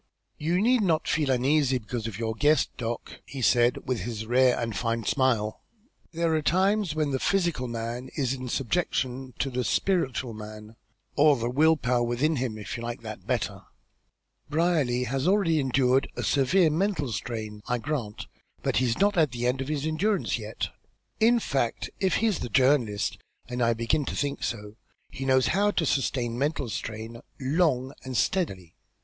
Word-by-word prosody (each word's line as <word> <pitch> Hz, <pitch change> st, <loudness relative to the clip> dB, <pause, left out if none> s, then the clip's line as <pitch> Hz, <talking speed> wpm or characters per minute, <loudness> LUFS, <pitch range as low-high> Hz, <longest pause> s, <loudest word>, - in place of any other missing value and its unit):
"You 170 Hz, +4 st, +1 dB
need 240 Hz, +3 st, +3 dB
not 165 Hz, -5 st, +1 dB
feel 150 Hz, -4 st, +1 dB
uneasy 135 Hz, +1 st, +2 dB
because 115 Hz, 0 st, -5 dB
of 105 Hz, -4 st, -6 dB
your 110 Hz, -1 st, -2 dB
guest, 150 Hz, +6 st, +2 dB
Doc.," 115 Hz, -1 st, -5 dB
he 135 Hz, -, -8 dB
said, 120 Hz, +1 st, +3 dB
with 125 Hz, -2 st, 0 dB
his 110 Hz, -2 st, -4 dB
rare 125 Hz, +2 st, +4 dB
and 115 Hz, -3 st, -3 dB
fine 115 Hz, +4 st, -1 dB
smile. 115 Hz, -4 st, +1 dB, 0.5 s
"There 165 Hz, -1 st, 0 dB
are 155 Hz, -, +2 dB
times 190 Hz, +2 st, +2 dB
when 155 Hz, -2 st, 0 dB
the 130 Hz, -, 0 dB
physical 170 Hz, -9 st, 0 dB
man 120 Hz, +2 st, -4 dB
is 135 Hz, -4 st, 0 dB
in 130 Hz, -1 st, -5 dB
subjection 130 Hz, -2 st, -1 dB
to 135 Hz, -, -1 dB
the 125 Hz, 0 st, -1 dB
spiritual 130 Hz, -, 0 dB
man, 110 Hz, 0 st, -9 dB, 0.4 s
or 150 Hz, 0 st, +6 dB
the 120 Hz, +1 st, -2 dB
will 160 Hz, +4 st, +4 dB
power 125 Hz, -3 st, +1 dB
within 125 Hz, +6 st, +1 dB
him, 120 Hz, -4 st, -2 dB
if 105 Hz, -, -6 dB
you -, -, -7 dB
like 120 Hz, 0 st, -5 dB
that 110 Hz, -1 st, -8 dB
better. -, -, -1 dB, 0.9 s
Brierly 150 Hz, -6 st, +1 dB
has 130 Hz, +5 st, -1 dB
already 185 Hz, -5 st, +3 dB
endured 130 Hz, -1 st, +2 dB
a -, -, -3 dB
severe 155 Hz, +5 st, +3 dB
mental 160 Hz, -, 0 dB
strain, 110 Hz, 0 st, -5 dB
I 125 Hz, -, +1 dB
grant, 120 Hz, -5 st, -4 dB, 0.4 s
but -, -, +1 dB
he's 120 Hz, -2 st, +1 dB
not 205 Hz, 0 st, +2 dB
at 155 Hz, -3 st, +4 dB
the 120 Hz, 0 st, -4 dB
end 125 Hz, +2 st, +1 dB
of 135 Hz, -, -4 dB
his 150 Hz, -1 st, -2 dB
endurance 190 Hz, +7 st, 0 dB
yet. -, -, -4 dB, 0.5 s
In 235 Hz, +2 st, +5 dB
fact, 135 Hz, -, -1 dB
if 190 Hz, -1 st, +2 dB
he's 220 Hz, -4 st, +1 dB
the 125 Hz, -, -4 dB
journalist, 130 Hz, -4 st, +2 dB, 0.3 s
and 125 Hz, 0 st, -4 dB
I 115 Hz, -1 st, +3 dB
begin 115 Hz, +6 st, 0 dB
to -, -, -4 dB
think 145 Hz, -1 st, -2 dB
so, 105 Hz, -1 st, -4 dB, 0.3 s
he 135 Hz, -, -5 dB
knows 130 Hz, -2 st, +3 dB
how 205 Hz, +3 st, +3 dB
to 175 Hz, -5 st, 0 dB
sustain 125 Hz, -4 st, 0 dB
mental 140 Hz, -3 st, -1 dB
strain 110 Hz, +2 st, -6 dB, 0.2 s
long 135 Hz, -2 st, +1 dB
and 130 Hz, -2 st, -3 dB
steadily. 95 Hz, -, -1 dB
130 Hz, 175 wpm, -27 LUFS, 120-155 Hz, 0.9 s, or